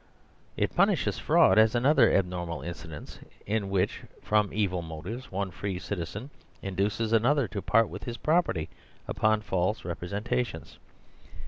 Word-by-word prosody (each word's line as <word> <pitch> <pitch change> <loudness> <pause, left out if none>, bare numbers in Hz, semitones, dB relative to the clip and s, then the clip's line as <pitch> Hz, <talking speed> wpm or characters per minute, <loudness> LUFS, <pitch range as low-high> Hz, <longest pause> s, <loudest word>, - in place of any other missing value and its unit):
It - - 0
punishes - - +2
fraud - - +5
as 110 +1 +5
another 135 +6 +5
abnor 90 -2 0
mal 85 -5 -5
incident 80 -2 -8 0.3
in 105 -1 -1
which, 95 -2 0 0.2
from 105 -2 +2
evil 95 -4 0
motives, 90 - -7
one 95 0 -2
free 95 +1 -4
citi 90 -2 -4
zen 110 - -8 0.3
induces 100 +4 -1
another 125 +3 +3
to 100 - -4
part 115 +2 +3
with - - -8
his 120 -1 -5
property 155 - +1 0.4
upon 110 0 +2
false 95 0 -1
representations. 100 +8 -3
100 Hz, 140 wpm, -28 LUFS, 90-115 Hz, 0.4 s, fraud